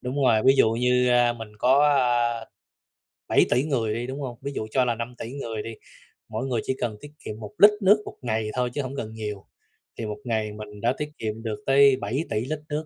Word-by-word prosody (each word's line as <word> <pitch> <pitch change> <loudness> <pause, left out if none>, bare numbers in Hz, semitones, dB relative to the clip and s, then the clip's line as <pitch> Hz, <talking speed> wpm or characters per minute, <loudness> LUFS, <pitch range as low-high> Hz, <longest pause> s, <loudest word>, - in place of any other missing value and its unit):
đúng 135 +2 -2
rồi, 110 -4 +4
ví 135 +1 +7
dụ 110 - +5
như, 125 +2 +2
a, 120 -1 +4
mình 115 -2 -8
có, 135 +5 +4
a, 120 -4 +2 0.8
7.000.000.000 125 - +3
người 120 -8 -1
đi, 120 +2 -3
đúng 135 +2 -5
hông? 125 -3 -5
Ví 140 - -4
dụ 110 - -4
cho 130 +1 +2
là 120 - 0
5.000.000.000 120 +1 -6
người 115 -6 -4
đi, 115 - -7 0.6
mỗi 115 +5 -3
người 120 -4 -1
chỉ - - -1
cần 115 -3 -2
tiết 145 - -11
kiệm 110 - -6
1 105 -2 -8
lít 205 +1 +9
nước 205 +2 +5
1 - - -8
ngày 110 -3 -1
thôi 125 -1 0
chứ 145 - -1
hổng 135 +1 -6
cần 110 -4 -5
nhiều, 105 -3 -6 0.5
thì 115 - -4
1 105 -1 -4
ngày 110 -3 -1
mình 105 -1 -10
đã 120 +2 +2
tiết 150 0 -3
kiệm 110 0 -4
được 105 -2 -4
tới 135 0 +6
7.000.000.000 115 0 -2
lít 155 +2 -3
nước, 150 +1 -2
120 Hz, 230 wpm, -25 LUFS, 110-135 Hz, 0.8 s, lít